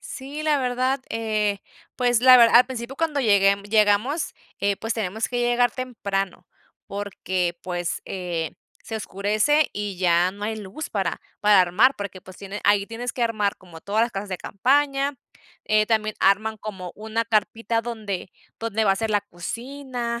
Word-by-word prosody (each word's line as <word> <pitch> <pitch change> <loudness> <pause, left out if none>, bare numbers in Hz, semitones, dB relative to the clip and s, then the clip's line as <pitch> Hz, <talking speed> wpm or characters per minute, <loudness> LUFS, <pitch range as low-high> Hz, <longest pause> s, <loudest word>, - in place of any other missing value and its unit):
Sí, 280 +3 -7
la 300 -2 +2
verdad, 255 +1 0
eh, 215 -3 0 0.4
pues 245 -2 +2
la 255 0 +9
verdad 235 -1 +7
al 245 +1 +7
principio 255 +1 -6
cuando 310 -3 0
llegue, 200 -4 +5
mm, 200 - -13
llegamos, 215 +8 +2 0.2
eh, 200 0 +1
pues, 225 +3 -3
tenemos 220 0 -2
que 245 - -2
llegar 240 0 +3
temprano, 200 -8 -3 0.4
porque, 185 -3 -2
pues, 175 -2 -3
eh, 175 -4 -4 0.3
se 225 - -5
oscurece 215 +9 +1
y 205 -2 -4
ya 175 0 +3
no 205 +1 -11
hay 220 +1 -2
luz 215 +9 -7
para 190 -5 -2 0.2
para 210 -2 +6
armar, 195 +10 +4
porque, 200 -2 -6
pues 185 0 -13
tiene 200 +1 -7
ahí 205 -1 +4
tienes 230 +3 -5
que 245 - -3
armar 215 -3 0
como 175 -4 -14
todas 210 +5 +1
las 235 - +1
casas 200 -1 -5
de 185 - -3
campaña, 275 +5 +1 0.5
eh, 215 0 +3
también 215 -1 0
arman 215 +3 +2
como 195 -4 -7
una 220 +2 -2
carpita 225 +1 0
donde 215 -6 -5 0.3
donde 225 -1 -1
va 200 - +4
a 195 - +2
ser 225 +3 -1
la 205 -1 +3
cocina, 235 +5 -5
215 Hz, 170 wpm, -24 LUFS, 195-240 Hz, 0.5 s, la